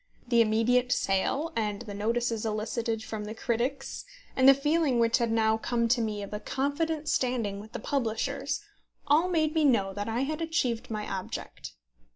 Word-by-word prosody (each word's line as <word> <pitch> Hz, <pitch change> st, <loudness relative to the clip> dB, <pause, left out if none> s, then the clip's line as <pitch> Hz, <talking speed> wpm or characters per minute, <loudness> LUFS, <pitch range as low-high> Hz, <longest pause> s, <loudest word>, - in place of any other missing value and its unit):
The 235 Hz, -2 st, +5 dB
immediate 235 Hz, +3 st, +2 dB
sale, 245 Hz, +11 st, 0 dB
and 210 Hz, -1 st, -1 dB
the 210 Hz, -3 st, -7 dB
notices 230 Hz, +2 st, -1 dB
elicited 225 Hz, +1 st, -2 dB
from 220 Hz, -3 st, -5 dB
the 215 Hz, +1 st, -6 dB
critics, 255 Hz, +4 st, -2 dB, 0.3 s
and 260 Hz, +1 st, +7 dB
the 275 Hz, -, +8 dB
feeling 295 Hz, -1 st, +2 dB
which 230 Hz, +1 st, +3 dB
had 235 Hz, -1 st, +1 dB
now 220 Hz, -1 st, +3 dB
come 235 Hz, +1 st, 0 dB
to 240 Hz, 0 st, +3 dB
me 210 Hz, -2 st, -2 dB
of 200 Hz, -, -8 dB
a 210 Hz, -, -3 dB
confident 295 Hz, +6 st, -1 dB
standing 240 Hz, -8 st, 0 dB
with 215 Hz, +2 st, -12 dB
the -, -, -4 dB
publishers, 275 Hz, -, -2 dB, 0.4 s
all 305 Hz, +5 st, +3 dB
made 310 Hz, -3 st, +1 dB
me 320 Hz, -1 st, +2 dB
know 210 Hz, -9 st, +3 dB
that 205 Hz, +2 st, -4 dB
I 230 Hz, +3 st, 0 dB
had 305 Hz, +4 st, -2 dB
achieved 250 Hz, -8 st, -1 dB
my 215 Hz, -2 st, -3 dB
object. 190 Hz, -2 st, -6 dB
235 Hz, 180 wpm, -28 LUFS, 220-275 Hz, 0.4 s, the